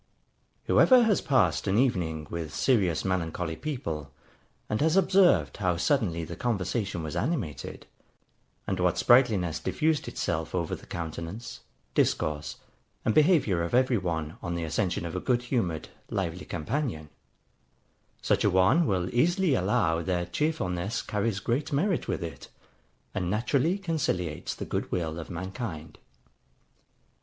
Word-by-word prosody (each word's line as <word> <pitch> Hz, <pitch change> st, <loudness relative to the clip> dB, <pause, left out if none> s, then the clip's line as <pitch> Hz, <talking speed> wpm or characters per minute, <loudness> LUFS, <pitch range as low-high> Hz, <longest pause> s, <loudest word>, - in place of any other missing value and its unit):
Whoever 255 Hz, -2 st, +6 dB
has 220 Hz, -4 st, +2 dB
passed 135 Hz, -7 st, +2 dB
an 95 Hz, +2 st, +2 dB
evening 85 Hz, -, +1 dB
with 85 Hz, -3 st, -4 dB
serious 95 Hz, -, +2 dB
melancholy 90 Hz, -2 st, -1 dB
people, 80 Hz, -, -4 dB, 0.6 s
and 105 Hz, -, -1 dB
has 160 Hz, +4 st, +3 dB
observed 180 Hz, -, +4 dB
how 90 Hz, -4 st, 0 dB
suddenly 90 Hz, -, +1 dB
the -, -, -7 dB
conversation 100 Hz, -5 st, -2 dB
was 75 Hz, -2 st, -5 dB
animated, 125 Hz, -, -3 dB, 0.8 s
and 95 Hz, -, -2 dB
what 90 Hz, -1 st, +2 dB
sprightliness 110 Hz, -10 st, +4 dB
diffused 155 Hz, -1 st, 0 dB
itself 80 Hz, +2 st, -2 dB
over 85 Hz, -3 st, -1 dB
the -, -, -14 dB
countenance, 85 Hz, +6 st, -6 dB, 0.3 s
discourse, 75 Hz, 0 st, 0 dB, 0.5 s
and 110 Hz, -, +3 dB
behaviour 150 Hz, -, +4 dB
of 85 Hz, +6 st, -1 dB
every 130 Hz, -3 st, +3 dB
one, 80 Hz, -3 st, -3 dB
on 85 Hz, -, -3 dB
the 85 Hz, -, -2 dB
accession 85 Hz, +2 st, -1 dB
of 85 Hz, -, -5 dB
a -, -, 0 dB
good 120 Hz, +4 st, +1 dB
humoured, 100 Hz, -, -1 dB, 0.2 s
lively 90 Hz, -2 st, -3 dB
companion; 85 Hz, -, -3 dB, 1.1 s
such -, -, +2 dB
a -, -, +4 dB
one 95 Hz, -, +4 dB
will 90 Hz, -2 st, 0 dB
easily 175 Hz, +5 st, +3 dB
allow 85 Hz, -6 st, +1 dB
that 90 Hz, 0 st, -2 dB
cheerfulness 110 Hz, -, -1 dB
carries 105 Hz, -2 st, -1 dB
great 120 Hz, +8 st, -1 dB
merit 170 Hz, +5 st, +1 dB
with -, -, -2 dB
it, 80 Hz, -, -7 dB, 0.7 s
and 90 Hz, -1 st, -2 dB
naturally 135 Hz, -, +1 dB
conciliates 135 Hz, -, -2 dB
the -, -, -5 dB
good -, -, -3 dB
will 80 Hz, -2 st, -2 dB
of 80 Hz, -, -8 dB
mankind. 95 Hz, -2 st, -6 dB
95 Hz, 135 wpm, -28 LUFS, 85-130 Hz, 1.1 s, Whoever